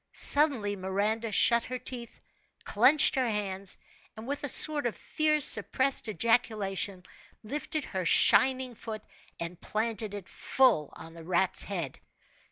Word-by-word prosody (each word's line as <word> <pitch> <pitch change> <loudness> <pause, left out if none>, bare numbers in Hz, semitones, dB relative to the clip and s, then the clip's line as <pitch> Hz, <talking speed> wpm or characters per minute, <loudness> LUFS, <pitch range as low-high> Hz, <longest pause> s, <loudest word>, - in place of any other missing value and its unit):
Suddenly, 270 -9 +2
Miranda 205 +4 -3
shut 235 +3 +3
her 255 - -5
teeth, 245 -1 -8 0.4
clenched 305 -1 +3
her 255 -3 -1
hands, 195 -3 -4 0.4
and 220 - -9
with 285 +3 -5
a 290 - 0
sort 295 -1 +6
of 230 - -5
fierce 305 -2 +1
suppressed 265 -3 +2
ejaculation, 205 -3 -1 0.4
lifted 295 +6 -5
her 190 -6 -5
shining 260 +7 +3
foot 215 -1 -9 0.4
and 170 +1 -7
planted 215 -1 -3
it 200 -3 -9
full 235 - +1
on 165 0 -12
the 165 -1 -12
rat's 180 +2 0
head. 170 -9 -6
220 Hz, 135 wpm, -28 LUFS, 195-260 Hz, 0.4 s, sort